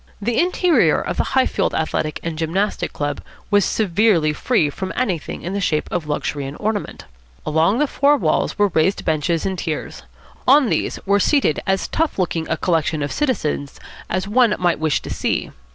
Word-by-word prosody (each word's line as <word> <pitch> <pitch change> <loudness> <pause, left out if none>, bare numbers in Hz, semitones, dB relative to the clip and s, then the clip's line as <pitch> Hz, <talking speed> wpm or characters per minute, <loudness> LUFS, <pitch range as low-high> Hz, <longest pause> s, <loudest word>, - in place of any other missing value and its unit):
The 230 +3 0
interior 360 -1 +3
of - - -4
the - - +2
Highfield 260 - +1
Athletic 155 -1 -1
and 165 -1 -3
Gymnastic 170 +6 -1
Club 145 -1 -3 0.3
was 205 -1 +4
severely 185 -6 +2
free 155 - +1
from 190 +5 -5
anything 190 - -2
in 180 - -4
the 200 - -2
shape 155 -5 0
of 165 -4 -2
luxury 145 -1 -2
and 140 - -8
ornament. 210 -1 -3 0.4
Along 160 +7 +2
the 295 - +3
four 285 +1 +3
walls 160 - 0
were 205 -1 +3
raised 175 +3 +1
benches 160 +1 0
in 190 -1 -2
tiers. 160 -3 -4 0.5
On 270 -1 +6
these - - -1
were 200 +1 +3
seated 275 - +2
as 190 0 +1
tough 325 -1 -1
looking 170 -3 -1
a 165 - 0
collection 160 -3 0
of 145 - -3
citizens 175 - -2 0.3
as 185 +1 -1
one 230 0 +3
might 175 -2 +1
wish 155 -2 +1
to - - -7
see. - - -2
185 Hz, 180 wpm, -20 LUFS, 155-215 Hz, 0.5 s, On